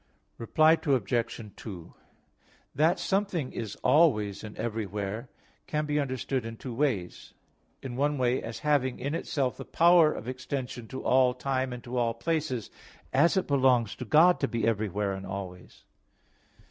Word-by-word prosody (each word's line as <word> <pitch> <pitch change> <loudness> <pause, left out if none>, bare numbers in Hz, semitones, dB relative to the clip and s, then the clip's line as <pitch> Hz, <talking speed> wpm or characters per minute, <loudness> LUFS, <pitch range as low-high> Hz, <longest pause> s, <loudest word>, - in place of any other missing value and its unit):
Reply 155 +7 +4
Obj. 115 -4 -1
2: 90 -7 -9 0.8
That 160 +6 +3
something 180 -5 -1
is 110 -4 -5
always 105 - +3
and 105 -1 -9
everywhere, 105 +1 -4 0.4
can 150 0 -1
be 150 0 0
understood 130 -2 -2
in 115 0 -7
two 125 0 -7
ways. 115 -9 -2 0.5
In 130 -2 -5
one 145 +2 +1
way, 125 0 +1
as 115 - -6
having 140 -4 +2
in 140 +4 -3
itself 140 -5 -1
the - - -6
power 170 -2 +5
of 115 - -7
extension 130 -2 -5
to 130 +2 -7
all 130 -1 +3
time 130 0 -1
and 125 -1 -7
to 125 +1 -5
all 115 -1 +1
places, 140 -2 -2 0.4
as 160 +8 +4
it 190 - +1
belongs 130 -6 +3
to - - -6
God 170 +4 +5
to 135 - +1
be 115 -2 -2
everywhere 105 -3 0
and 95 0 -6
always. 95 -2 -8
125 Hz, 155 wpm, -28 LUFS, 115-145 Hz, 0.8 s, power